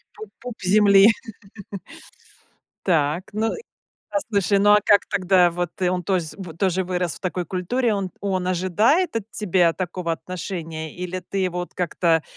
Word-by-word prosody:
Пуп 435 0 -10
пуп 245 -1 -7
земли. 200 +1 +6 1.8
Так. 165 0 +1
Ну 220 +2 -1
и, - - -7 0.5
а, - - +1
слушай, 200 -1 +2
ну 205 +1 +4
а 210 - +7
как 205 -1 +4
тогда 185 -3 +3
Вот 175 0 -3
и 180 - +3
он 180 0 -1
тозь 175 -4 -1
в 175 -5 -8
тоже 190 -1 0
вырос 180 -3 -2
в - - -12
такой 180 -1 -2
культуре. 215 +7 0
Он 195 -2 -3
он 190 -2 -1
ожидает 215 - +2
от 225 -1 -4
тебя 180 -5 +2
такого 175 -1 -3
отношения, 165 -3 -6
или 180 +1 -5
ты 195 +2 -5
его 185 -2 -1
вот, 175 - -7
как-то 170 -2 +1
185 Hz, 165 wpm, -22 LUFS, 175-200 Hz, 1.8 s, а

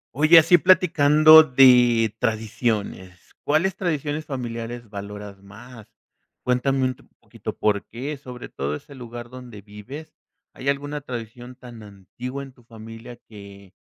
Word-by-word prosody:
Oye, 155 +4 +6
así 165 +2 +6
platicando 155 -3 +6
de 125 -5 +4
tradiciones, 110 -5 -3
¿cuáles 170 +5 +1
tradiciones 155 -4 -3
familiares 120 -3 -6
valoras 100 -1 -9
más? 110 +3 -14 0.6
Cuéntame 130 +2 0
un 130 0 -2 0.2
poquito, - - -9
¿por 105 -1 0
qué?, 135 +6 -6
sobre 125 -3 -10
todo 70 +2 -4
ese 140 - -12
lugar 120 -2 -10
donde 125 -5 -11
vives, 110 +10 -11 0.4
¿hay 135 - -4
alguna 145 +1 -3
tradición 120 -1 -9
tan 120 -3 -13
antigua 110 +7 -9
en 135 -1 -13
tu 125 - -23
familia 115 +1 -12
que 100 -2 -14
125 Hz, 130 wpm, -22 LUFS, 110-140 Hz, 0.6 s, Oye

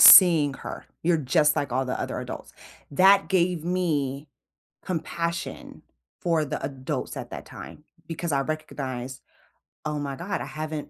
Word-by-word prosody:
seeing 160 -7 +10
her. - - -7 0.2
You're 170 +1 +4
just 150 +1 +3
like 140 -4 -1
all 130 +2 +1
the 130 - -2
other - - -3
adults." - - -7 0.4
That 195 +6 +6
gave 180 -3 +2
me 150 -6 0 0.6
compassion 170 -1 -3 0.4
for 165 -3 +2
the 140 - -4
adults 130 -2 -3
at - - -6
that - - -6
time 150 - -10 0.2
because 165 0 -3
I 140 - +3
recognized, 130 -4 -4 0.6
"Oh 150 -1 -1
my 140 -1 -3
god. 185 +7 -3
I - - -3
haven't" 155 -1 -5
155 Hz, 150 wpm, -26 LUFS, 140-170 Hz, 0.6 s, seeing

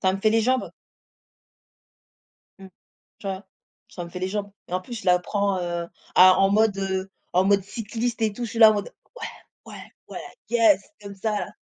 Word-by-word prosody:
ça 190 -1 +2
me 195 - -4
fait 215 - +3
les 225 +1 +3
jambes. 255 +3 0 1.9
Mmh. 195 0 -12 0.5
Tu - - -10
vois? 190 0 -4 0.4
Ça 175 - -7
me - - -9
fait 180 - -6
les 185 +1 -2
jambes 205 +1 -3 0.2
et - - -12
en 185 - 0
plus, 240 +6 -9
je - - -12
la 180 0 +5
prends, 200 +1 -1
heu, 175 -1 -3 0.3
à 185 0 +8
en 195 0 +4
mode 210 -1 +2 0.5
en 185 +2 +3
mode 200 0 +3
cycliste 225 +3 -4
et 215 - +2
tout. 240 +4 -5
Je 230 - -5
suis 230 - -5
là, 220 -1 +9
en 215 - +1
mode: 205 - -4 0.2
«Ouais, 460 -1 -5 0.5
ouais, - - -11 0.2
ouais, - - -7 0.3
yes», 225 -5 +4 0.2
comme 200 -1 -9
ça, 215 +3 -2
là. - - -7
200 Hz, 205 wpm, -24 LUFS, 190-220 Hz, 1.9 s, là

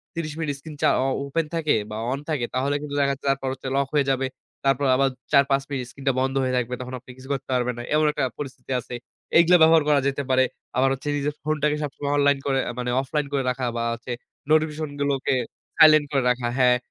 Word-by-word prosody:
৩০ 160 -2 -3
minute 150 -3 -1
screen 155 +1 -10
চা - - +4
ও - - 0 0.2
open 160 +4 -1
থাকে 160 -2 +2 0.2
বা 105 - -4
অন 135 - -2
থাকে 145 -6 0
তাহলে 135 +2 +1
কিন্তু 145 -1 -5
দেখা 140 -1 +3
যাচ্ছে 135 - -11
তারপর 135 -1 -2
হচ্ছে 135 0 -8
লক 140 0 +1
হয়ে 145 -2 +3
যাবে। 135 0 0 0.4
তারপর 135 +1 +2
আবার 135 +1 +3 0.2
৪-৫ 140 -1 +4
মিনিট 130 -2 -2
স্ক্রিনটা 135 0 -1
বন্ধ 135 +1 0
হয়ে 130 0 0
থাকবে। 125 0 -2
তখন 125 0 -7
আপনি 125 +1 -14
কিছু 130 +1 -13
করতে 135 -1 -5
পারবেন 125 0 +1
না। 120 - -5
এমন 155 0 +3
একটা 150 -2 -2 0.2
পরিস্থিতি 135 -2 -7
আছে। 125 0 -7 0.4
এইগুলা 170 +2 +6
ব্যবহার 160 0 +6
করা 145 -1 +5
যেতে 140 +1 -1
পারে। 130 0 +4 0.3
আবার 135 +1 +4
হচ্ছে 135 +2 -7
নিজের 145 +1 -1
ফোনটাকে 150 0 0
সবসময় 145 0 -3
অনলাইন 145 -1 +3
করে 135 -1 +2 0.2
মানে 125 0 -2
অফলাইন 145 +2 -2
করে 140 -1 +1
রাখা। 125 0 -2
বা 115 - -1
হচ্ছে 115 +2 -7 0.4
নোটিফিকেশন 155 -1 +1
গুলোকে 140 -1 0 0.4
সাইলেন্ট 155 -1 +7
করে 135 -3 +1
রাখা। 125 -1 0
হ্যাঁ। 125 -1 +5
140 Hz, 215 wpm, -24 LUFS, 130-150 Hz, 0.4 s, সাইলেন্ট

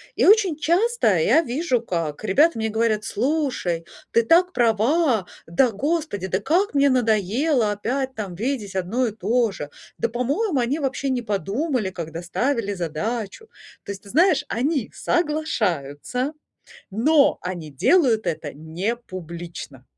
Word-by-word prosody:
И - - +2
очень 395 -6 +5
часто 345 - +2
я 240 - +4
вижу, 255 -2 0
как 165 -6 -3
ребята 290 - +4
мне 220 0 -1
говорят: 220 -1 +1
Слушай, 235 - -1 0.3
ты 230 - +4
так 355 +8 +4
права, 235 - +2 0.2
да 205 +10 +3
господи, 285 - -2
да 185 0 0
как 335 - +1
мне 280 0 +5
надоело 230 - +2
опять 260 +6 -2
там 200 -6 -5
видеть 215 -2 -3
одно 210 +8 0
и - - -2
то 230 +2 +1
же. 145 -6 -7 0.3
Да, 230 - 0
по-моему, 275 - 0
они 250 +6 0
вообще 275 -1 -2
не 255 -2 0
подумали, 215 - -1
когда 165 -1 -6
ставили 230 +3 -1
задачу. 200 - -4 0.4
То - - -4
есть, 195 -1 -8
ты 200 - -13
знаешь, 325 - +3
они 270 +1 -1
соглашаются, 250 - -1 0.6
но 275 +8 +3
они 175 -4 -5
делают 230 - +3
это 155 -3 -3
непублично. 170 - -6
230 Hz, 140 wpm, -23 LUFS, 190-285 Hz, 0.6 s, очень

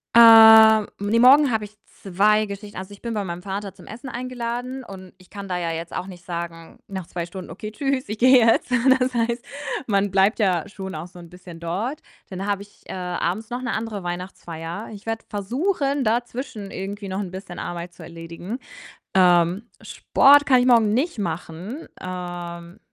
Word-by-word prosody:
Äh, 220 -2 +9
ne, 205 +3 +1
morgen 270 +2 +7
habe 215 -1 -1
ich 210 +1 -16 0.2
2 210 +3 +2
Geschichten. 205 0 -8
Also, 190 +2 -7
ich 200 - -15
bin 235 -1 -4
bei 205 -2 -2
meinem 175 -1 -6
Vater 195 -1 -5
zum - - -16
Essen 240 +5 -9
eingeladen 250 +1 -5
und 185 -2 -11
ich 185 - -21
kann 200 -1 -8
da 180 - -1
ja 170 -1 -2
jetzt 165 +1 -6
auch 185 - -4
nicht 180 -2 -11
sagen, 170 -1 -7
nach 190 -3 -6
2 175 -1 -4
Stunden: 180 0 -9
„Okay, 210 +5 -7
tschüss, 270 0 -2
ich 215 +1 -5
gehe 255 +1 +7
jetzt.“ 230 +1 +3 0.3
Das 255 0 -1
heißt, 235 +1 -1 0.4
man 200 -1 +1
bleibt 195 +4 +3
ja 185 -4 +1
schon 190 -3 -7
auch 160 +3 -6
so 180 0 -15
'n 170 -1 -12
bisschen 175 -2 -12
dort. 200 - -3 0.3
Dann 190 +1 -5
habe 200 -1 -1
ich, 205 0 -16
äh, - - -6
abends 180 +3 -3
noch 245 +1 -4
'ne 250 - -3
andere 220 -3 -4
Weihnachtsfeier. 175 +1 -6
Ich 205 - -12
werde 225 0 -4
versuchen, 275 - -1
dazwischen 235 -2 -3
irgendwie 200 +1 -6
noch 190 - -3
'n 190 -3 -4
bisschen 185 -1 -8
Arbeit 175 0 -6
zu - - -15
erledigen. 170 +7 -8 0.6
Ähm, 180 +3 +3
Sport 285 +1 +4
kann 255 -2 +5
ich 245 - +1
morgen 225 -4 +4
nicht 275 +1 -1
machen. 175 - -5
Ähm, 175 -1 -7
200 Hz, 190 wpm, -23 LUFS, 180-230 Hz, 0.6 s, Äh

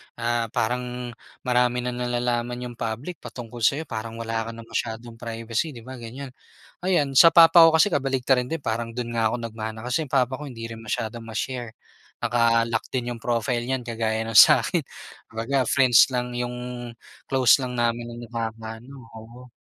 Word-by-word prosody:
ah, 120 0 -1
parang 125 +1 -2 0.3
marami 125 -1 +1
nang 125 0 -3
nalalaman 120 0 -1
yung 120 -1 -7
public 120 +10 -4
patungkol 120 -1 -9
sayo 140 +7 +2
parang 115 -5 -6
wala 115 0 -3
ka - - -4
ng 115 - -9
masyadong 115 +1 -4
privacy 115 +5 -3
di 115 - -10
ba, 130 +1 -9
ganyan. 130 +4 -8 0.5
Ayan 160 -7 +1
sa 165 +5 +8
papa 170 0 +8
ko 165 - +8
kasi 160 +4 +5
kabaliktaran 130 -6 +1
din 165 - -1
parang 115 -4 -3
dun 120 0 -5
nga 110 -1 +2
ako 120 - -2
nag-mana 110 0 -6
kasi 125 +6 0
yung 145 - -8
papa 130 -1 +2
ko 130 - -7
hindi 115 -2 -7
rin 115 0 -9
masyadong 110 +1 -4
ma-share, 120 +2 -4 0.5
naka-lock 115 -1 +2
din 120 -2 -2
yung 115 - -12
profile 120 0 0
niyan 125 0 -3
kagaya 110 -1 -1
ng 115 - -5
sakin 105 - +6 0.5
Kumbaga 130 +5 0
friends 130 -2 +5
lang 125 -1 -2
yung, 120 0 -3 0.8
close 130 0 +5
lang 125 -1 -4
namin 120 0 0
ang 120 - -9
nakaka-ano 115 +3 -7
oo 115 +3 -12
120 Hz, 170 wpm, -24 LUFS, 115-125 Hz, 0.8 s, sa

